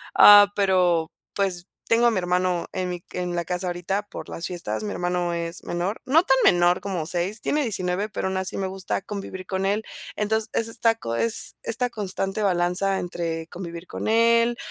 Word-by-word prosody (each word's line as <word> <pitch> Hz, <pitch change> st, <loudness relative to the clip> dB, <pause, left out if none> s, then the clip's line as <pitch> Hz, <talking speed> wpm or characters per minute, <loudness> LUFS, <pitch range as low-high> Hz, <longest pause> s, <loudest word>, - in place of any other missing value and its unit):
ah, 205 Hz, 0 st, +9 dB
pero 180 Hz, -5 st, +2 dB, 0.2 s
pues, 185 Hz, -3 st, -1 dB, 0.2 s
tengo 235 Hz, +1 st, +4 dB
a -, -, +4 dB
mi 205 Hz, -, -1 dB
hermano 180 Hz, -1 st, 0 dB
en 185 Hz, -1 st, -2 dB
mi 175 Hz, -1 st, -5 dB
en 180 Hz, -1 st, -3 dB
la 170 Hz, -1 st, -2 dB
casa 180 Hz, 0 st, -2 dB
ahorita 190 Hz, +4 st, -2 dB
por -, -, -8 dB
las 165 Hz, -, -4 dB
fiestas, 180 Hz, +4 st, -4 dB
mi 205 Hz, -, -3 dB
hermano 175 Hz, -1 st, -1 dB
es 170 Hz, 0 st, -3 dB
menor, 175 Hz, +5 st, -3 dB
no 310 Hz, +6 st, +4 dB
tan 265 Hz, -, +4 dB
menor 175 Hz, +1 st, +4 dB
como 180 Hz, -5 st, -3 dB
6, 180 Hz, +6 st, -2 dB
tiene 300 Hz, +1 st, 0 dB
19, 195 Hz, -2 st, -1 dB
pero 190 Hz, -, -3 dB
aún 190 Hz, 0 st, -2 dB
así 190 Hz, 0 st, -3 dB
me 195 Hz, -, -1 dB
gusta 190 Hz, 0 st, -3 dB
convivir 195 Hz, -2 st, -6 dB
con 190 Hz, +1 st, -1 dB
él. 210 Hz, +2 st, 0 dB, 0.3 s
Entonces, 220 Hz, +1 st, -1 dB
es 230 Hz, -, 0 dB
esta 225 Hz, 0 st, +1 dB
co 115 Hz, -, -4 dB
es 230 Hz, -, 0 dB
esta 245 Hz, +2 st, -1 dB
constante 195 Hz, -1 st, -3 dB
balanza 185 Hz, +1 st, +1 dB
entre 165 Hz, -2 st, -3 dB
convivir 170 Hz, -1 st, -7 dB
con -, -, -5 dB
él 230 Hz, +1 st, +3 dB
190 Hz, 190 wpm, -24 LUFS, 175-210 Hz, 0.3 s, ah